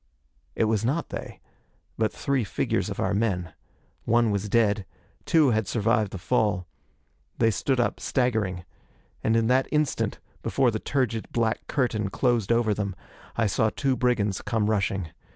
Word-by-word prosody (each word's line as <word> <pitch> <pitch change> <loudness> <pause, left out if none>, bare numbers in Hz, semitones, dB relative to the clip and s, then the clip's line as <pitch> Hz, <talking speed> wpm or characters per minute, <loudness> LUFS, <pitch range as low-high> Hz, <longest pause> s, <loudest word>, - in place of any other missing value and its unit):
It - - +2
was 110 -1 +1
not 145 +8 0
they, - - -7 0.5
but 110 -2 +1
three 135 -3 0
figures 100 - -1
of - - -5
our 95 - +1
men. 95 -5 -1 0.5
One 115 -1 +3
was 100 +1 -2
dead. 105 -4 +2 0.4
Two 155 -5 +5
had 110 -3 0
survived 110 -2 +1
the 95 - -6
fall. 100 -2 +1 0.7
They 115 -1 +3
stood 130 +4 0
up, 120 - 0
staggering. 110 -9 0 0.6
And 110 - +2
in 115 - +2
that 130 +1 +3
instant, 150 -2 0 0.2
before 130 -3 +2
the 110 - -2
turgid 120 -5 -1
black 115 -1 0
curtain 115 -7 0
closed 120 -1 +1
over 115 -2 +3
them, 100 -2 -3 0.4
I 115 - +1
saw 110 +2 +2
two 135 +4 0
brigands 110 -7 +1
come 110 -2 0
rushing. 95 -4 0
110 Hz, 155 wpm, -26 LUFS, 100-125 Hz, 0.7 s, Two